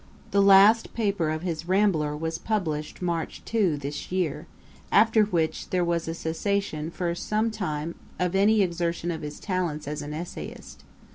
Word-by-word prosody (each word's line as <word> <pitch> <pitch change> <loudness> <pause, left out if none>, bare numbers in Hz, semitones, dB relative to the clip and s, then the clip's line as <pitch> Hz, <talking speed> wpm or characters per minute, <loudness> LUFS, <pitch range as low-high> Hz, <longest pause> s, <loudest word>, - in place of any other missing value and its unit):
The 200 - +4
last 200 +3 +6
paper 200 -8 0
of 155 +1 -3
his 170 -2 -3
Rambler 180 -6 +2
was 160 +1 -3
published 165 -7 -2
March 170 -2 -3
2, 200 -9 +1
this 145 +3 -6
year; 170 -3 -1 0.4
after 220 0 +5
which, 170 -5 -1
there 180 -1 +1
was 170 -1 -1
a 165 - -3
cessation 165 -1 -2
for 170 0 -2
some 215 +5 -1
time 165 -6 -3 0.2
of 180 0 0
any 205 +2 +4
exertion 170 -1 -1
of 160 - -5
his 150 -1 -7
talents 175 -7 -2
as 150 +1 -3
an 145 0 -6
essayist. 170 +2 -8
170 Hz, 160 wpm, -26 LUFS, 155-200 Hz, 0.4 s, last